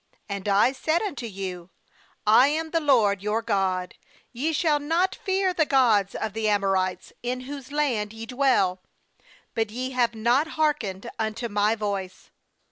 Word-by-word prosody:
10And 200 0 -4
I 205 +5 +4
said 315 +7 0
unto 285 - -4
you: 185 -3 -6 0.6
I 225 +5 +6
am 320 +2 -2
the 330 - +2
LORD 225 - +3
your 210 +2 -1
God; 190 -4 0 0.4
ye 280 +7 -1
shall 305 -1 +2
not 330 +6 +1
fear 380 -1 +1
the 335 - +3
gods 225 -8 +3
of 220 -2 -3
the 220 -1 0
Amorites, 195 -3 0
in 250 +1 -3
whose 275 0 -8
land 250 -9 0
ye 225 0 -8
dwell; 235 -8 +1 0.7
but 225 -1 -1
ye 255 +4 -4
have 240 -2 +1
not 240 +7 +2
hearkened 240 -10 0
unto 220 +2 -2
My 210 +1 +2
voice.' 200 -4 -5
230 Hz, 155 wpm, -25 LUFS, 200-285 Hz, 0.7 s, I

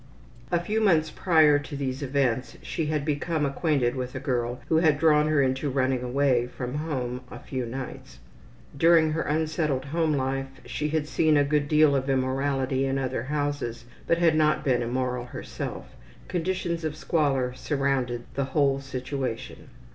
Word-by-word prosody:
A 175 - +3
few 210 +6 -1
months 160 -7 +3
prior 155 -5 +4
to 145 +1 -8
these 135 -1 -3
events 130 -2 0
she 160 -3 -2
had 150 -2 -1
become 155 +1 0
acquainted 140 -3 +1
with 125 0 -4
a - - -2
girl 125 -3 -2
who 160 - +3
had 160 -3 +4
drawn 150 -1 +4
her 155 -2 +3
into 130 +2 0
running 130 -1 +1
away 125 -1 +1
from 125 0 -6
home 130 -5 -3
a - - -8
few 130 -3 -4
nights. 125 - -7 0.6
During 160 +1 +5
her 160 +1 -1
unsettled 155 -3 -1
home 160 +2 0
life 135 -1 -1 0.2
she 150 - -2
had 155 -1 -1
seen 155 -1 +3
a 145 - +5
good 145 0 +1
deal 150 -1 +4
of 135 0 -1
immorality 135 0 0
in 135 0 0
other 130 -3 -2
houses, 145 -5 -2 0.2
but 170 - +3
had 165 -2 +3
not 155 0 +2
been 125 -3 +2
immoral 125 +1 -2
herself. 125 - -7 0.3
Conditions 175 -1 -2
of 155 -1 -2
squalor 140 -6 0
surrounded 130 -3 -1
the 140 - -1
whole 140 -2 +3
situation. 130 -2 -5
140 Hz, 165 wpm, -26 LUFS, 130-155 Hz, 0.6 s, During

